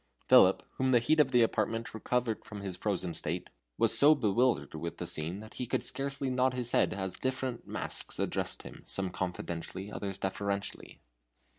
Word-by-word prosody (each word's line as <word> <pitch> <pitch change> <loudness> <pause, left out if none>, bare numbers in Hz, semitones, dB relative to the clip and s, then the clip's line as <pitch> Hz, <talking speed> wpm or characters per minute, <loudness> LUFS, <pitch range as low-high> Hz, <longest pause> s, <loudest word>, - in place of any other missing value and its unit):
Philip, - - +7
whom 130 0 +1
the 125 - +6
heat 155 +7 +2
of 145 -3 +5
the 125 -2 +5
apartment 115 0 -1
recovered 115 0 -1
from 105 -2 -8
his 95 -2 -4
frozen 90 -2 -1
state, 85 +3 -4 0.3
was - - +6
so 150 +2 +8
bewildered 120 0 +1
with 85 +2 -5
the 90 - -4
scene 85 +3 -2
that 110 - -12
he 125 - -4
could - - 0
scarcely 135 -1 -3
nod 130 0 +2
his 120 -1 -3
head - - +3
as 95 -2 -4
different 130 -2 -3
masks - - -5
addressed - - -2
him, - - -10
some 95 -2 -2
confidentially, 90 +1 -4
others 100 -2 -4
deferentially. 100 +1 -3
110 Hz, 175 wpm, -31 LUFS, 95-125 Hz, 0.3 s, so